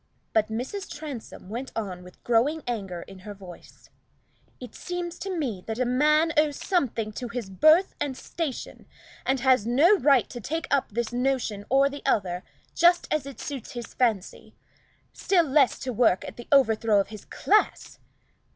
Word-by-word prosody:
But 215 Hz, -1 st, +3 dB
Mrs. 260 Hz, -, -5 dB
Transome 290 Hz, -10 st, -8 dB
went 240 Hz, +6 st, -5 dB
on 190 Hz, -5 st, -4 dB
with 180 Hz, 0 st, -16 dB
growing 265 Hz, +7 st, +2 dB
anger 195 Hz, -8 st, -4 dB
in 195 Hz, -1 st, -13 dB
her 205 Hz, +2 st, -9 dB
voice 185 Hz, -3 st, -14 dB, 0.7 s
"It 250 Hz, -, -9 dB
seems 350 Hz, -1 st, -5 dB
to 385 Hz, -2 st, -4 dB
me 230 Hz, -, -3 dB
that 220 Hz, 0 st, -3 dB
a 255 Hz, -, +1 dB
man 300 Hz, +6 st, +3 dB
owes 300 Hz, -1 st, +3 dB
something 245 Hz, -, -1 dB
to 245 Hz, +4 st, -6 dB
his 230 Hz, -4 st, -5 dB
birth 310 Hz, -, +5 dB
and 270 Hz, -3 st, -2 dB
station, 315 Hz, -7 st, -5 dB, 0.4 s
and 265 Hz, -1 st, +1 dB
has 255 Hz, -4 st, +3 dB
no 295 Hz, -, +5 dB
right 275 Hz, -4 st, +4 dB
to 240 Hz, -, -7 dB
take 320 Hz, +9 st, -3 dB
up 280 Hz, -1 st, +2 dB
this 235 Hz, +2 st, -3 dB
notion 245 Hz, -5 st, -1 dB
or 275 Hz, +2 st, +4 dB, 0.2 s
other, 180 Hz, -8 st, 0 dB, 0.3 s
just 345 Hz, +1 st, +4 dB
as 300 Hz, -3 st, -1 dB
it 275 Hz, -5 st, -9 dB
suits 275 Hz, -5 st, -6 dB
his 240 Hz, -2 st, -7 dB
fancy; 220 Hz, -7 st, -1 dB, 0.6 s
still 360 Hz, -3 st, +2 dB
less 275 Hz, -2 st, +3 dB
to 255 Hz, -1 st, -4 dB
work 220 Hz, -5 st, +3 dB
at -, -, -8 dB
the 240 Hz, -, -10 dB
overthrow 225 Hz, -6 st, +4 dB
of 195 Hz, -, -1 dB
his 215 Hz, -1 st, -10 dB
class. 425 Hz, +1 st, 0 dB
250 Hz, 170 wpm, -26 LUFS, 220-295 Hz, 0.7 s, birth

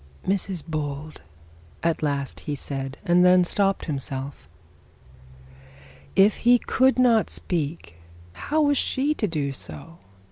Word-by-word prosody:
'Mrs 190 Hz, -3 st, -1 dB
Bold 150 Hz, -, -5 dB, 0.3 s
' 85 Hz, 0 st, -27 dB
at 165 Hz, -1 st, 0 dB
last 140 Hz, -3 st, -2 dB
he 145 Hz, -, -4 dB
said, 135 Hz, -1 st, -5 dB
and 175 Hz, -1 st, +4 dB
then 180 Hz, 0 st, +6 dB
stopped 195 Hz, +2 st, 0 dB
himself. 140 Hz, -2 st, -4 dB, 1.7 s
If 195 Hz, +2 st, +5 dB
he 245 Hz, +1 st, +5 dB
could 260 Hz, +2 st, +2 dB
not 235 Hz, -4 st, +4 dB
speak, 150 Hz, -, -4 dB, 0.4 s
how 305 Hz, -, 0 dB
was 285 Hz, -2 st, +3 dB
she 280 Hz, +3 st, +1 dB
to 215 Hz, -, -1 dB
do 150 Hz, -5 st, -2 dB
so? 165 Hz, +5 st, -10 dB
165 Hz, 130 wpm, -24 LUFS, 140-200 Hz, 1.7 s, then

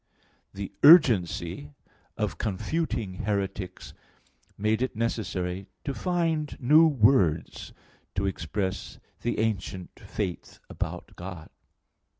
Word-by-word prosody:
The 100 Hz, -1 st, -6 dB
urgency 90 Hz, -, +5 dB, 0.4 s
of -, -, -2 dB
confuting 110 Hz, -, -2 dB
heretics 95 Hz, -2 st, -3 dB, 0.6 s
made 110 Hz, +2 st, +1 dB
it 130 Hz, -2 st, -1 dB
necessary 95 Hz, -5 st, -2 dB, 0.2 s
to 140 Hz, -, -2 dB
find 165 Hz, -3 st, -1 dB
new 150 Hz, +5 st, +6 dB
words 105 Hz, -, +2 dB, 0.4 s
to 100 Hz, -, 0 dB
express 95 Hz, +1 st, -3 dB, 0.2 s
the 120 Hz, -, -1 dB
ancient 95 Hz, -4 st, -3 dB
faith 95 Hz, -5 st, -5 dB
about -, -, -5 dB
God. 90 Hz, -3 st, -8 dB
105 Hz, 95 wpm, -27 LUFS, 90-130 Hz, 0.6 s, new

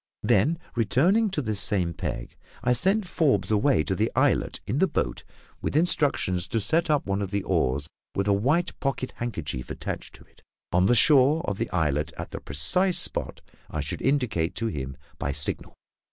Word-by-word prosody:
Then, 120 Hz, +9 st, +3 dB, 0.2 s
returning 150 Hz, -, +2 dB
to 155 Hz, -7 st, -2 dB
this 110 Hz, -3 st, 0 dB
same 90 Hz, -6 st, +2 dB
peg, -, -, -5 dB, 0.3 s
I 125 Hz, +1 st, +3 dB
sent 190 Hz, -, +3 dB
Forbes 155 Hz, -9 st, +1 dB
away 110 Hz, -, +3 dB
to -, -, -2 dB
the -, -, 0 dB
islet -, -, +1 dB
in 125 Hz, +8 st, -1 dB
the 190 Hz, -, +4 dB
boat, -, -, -2 dB, 0.4 s
with -, -, -3 dB
instructions 145 Hz, -, +1 dB
to 115 Hz, -, -1 dB
set 160 Hz, +10 st, +1 dB
up 150 Hz, -2 st, +2 dB
one 100 Hz, +1 st, -1 dB
of 100 Hz, -, -3 dB
the 100 Hz, 0 st, -2 dB
oars, 70 Hz, -1 st, 0 dB, 0.3 s
with 100 Hz, +1 st, -1 dB
a 100 Hz, -, +4 dB
white 145 Hz, -, 0 dB
pocket 130 Hz, -2 st, -2 dB
handkerchief 75 Hz, -, -4 dB
attached -, -, -6 dB
to -, -, -16 dB
it, -, -, -25 dB, 0.3 s
on 90 Hz, +2 st, +3 dB
the 120 Hz, -, +4 dB
shore 145 Hz, +5 st, +4 dB
of 100 Hz, -1 st, -2 dB
the 115 Hz, -, -2 dB
islet 75 Hz, -4 st, 0 dB
at -, -, -7 dB
the -, -, -5 dB
precise 170 Hz, -, +3 dB
spot -, -, -1 dB, 0.3 s
I 80 Hz, -, -3 dB
should 70 Hz, -, -5 dB
indicate 115 Hz, -, 0 dB
to 115 Hz, -, -2 dB
him 70 Hz, -10 st, -4 dB, 0.2 s
by 70 Hz, -2 st, -2 dB
signal. 75 Hz, +1 st, -1 dB
110 Hz, 185 wpm, -26 LUFS, 85-145 Hz, 0.4 s, the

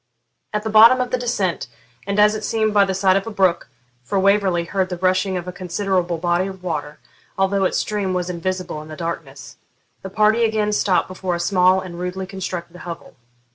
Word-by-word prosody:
At 210 Hz, 0 st, -2 dB
the 220 Hz, -, -2 dB
bottom 230 Hz, +4 st, +8 dB
of 250 Hz, -1 st, -2 dB
the 255 Hz, -, +1 dB
descent, 200 Hz, -, -1 dB, 0.4 s
and, 200 Hz, +1 st, 0 dB
as 210 Hz, 0 st, +5 dB
it 215 Hz, 0 st, -5 dB
seemed, 220 Hz, 0 st, 0 dB
by 200 Hz, -1 st, +5 dB
the 190 Hz, -1 st, -2 dB
side 190 Hz, 0 st, +3 dB
of 195 Hz, -, -3 dB
a -, -, -2 dB
brook 190 Hz, -5 st, +1 dB, 0.3 s
(for 195 Hz, -, -2 dB
Waverley 195 Hz, -3 st, +2 dB
heard 185 Hz, +2 st, -1 dB
the 180 Hz, -, -4 dB
rushing 185 Hz, +1 st, +1 dB
of 175 Hz, 0 st, -6 dB
a -, -, -3 dB
considerable 180 Hz, -1 st, -2 dB
body 175 Hz, +2 st, 0 dB
of 190 Hz, -1 st, -9 dB
water, 150 Hz, -4 st, -4 dB, 0.4 s
although 195 Hz, 0 st, +1 dB
its -, -, 0 dB
stream 205 Hz, -3 st, -1 dB
was 180 Hz, -1 st, -1 dB
invisible 180 Hz, -2 st, -4 dB
in 155 Hz, -, -11 dB
the 155 Hz, -, -8 dB
darkness), 165 Hz, -5 st, -6 dB, 0.4 s
the 190 Hz, -, -7 dB
party 215 Hz, +4 st, +3 dB
again 215 Hz, -2 st, +1 dB
stopped 200 Hz, -3 st, +1 dB
before 185 Hz, -1 st, -3 dB
a -, -, -4 dB
small 185 Hz, +1 st, +3 dB
and 175 Hz, -2 st, -8 dB
rudely 180 Hz, +1 st, -4 dB
constructed 180 Hz, -2 st, -6 dB
hovel. 175 Hz, -2 st, -9 dB
185 Hz, 205 wpm, -21 LUFS, 175-205 Hz, 0.4 s, bottom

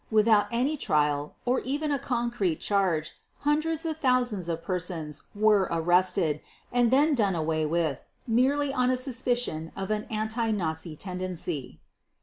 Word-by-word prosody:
Without 215 Hz, -1 st, +4 dB
any 260 Hz, +6 st, +1 dB
trial 150 Hz, -, 0 dB
or 255 Hz, +1 st, +2 dB
even 295 Hz, +3 st, -2 dB
a 280 Hz, -, +1 dB
concrete 235 Hz, -, -1 dB
charge 180 Hz, -6 st, +1 dB, 0.3 s
hundreds 310 Hz, +2 st, 0 dB
of 320 Hz, -1 st, -3 dB
thousands 245 Hz, -, +1 dB
of 165 Hz, 0 st, -3 dB
persons 170 Hz, -4 st, -3 dB
were 210 Hz, -2 st, +4 dB
arrested 170 Hz, -1 st, +2 dB, 0.3 s
and 245 Hz, -1 st, +3 dB
then 290 Hz, +5 st, +4 dB
done 205 Hz, -8 st, +2 dB
away 155 Hz, -1 st, 0 dB
with 160 Hz, -4 st, -1 dB, 0.2 s
merely 270 Hz, +4 st, +2 dB
on 250 Hz, -2 st, +2 dB
a 255 Hz, -, +2 dB
suspicion 245 Hz, -, -1 dB
of 195 Hz, +1 st, -4 dB
an 215 Hz, 0 st, -1 dB
anti 220 Hz, +1 st, -2 dB
Nazi 160 Hz, -5 st, -2 dB
tendency. 180 Hz, -5 st, -5 dB
210 Hz, 140 wpm, -27 LUFS, 165-250 Hz, 0.3 s, Without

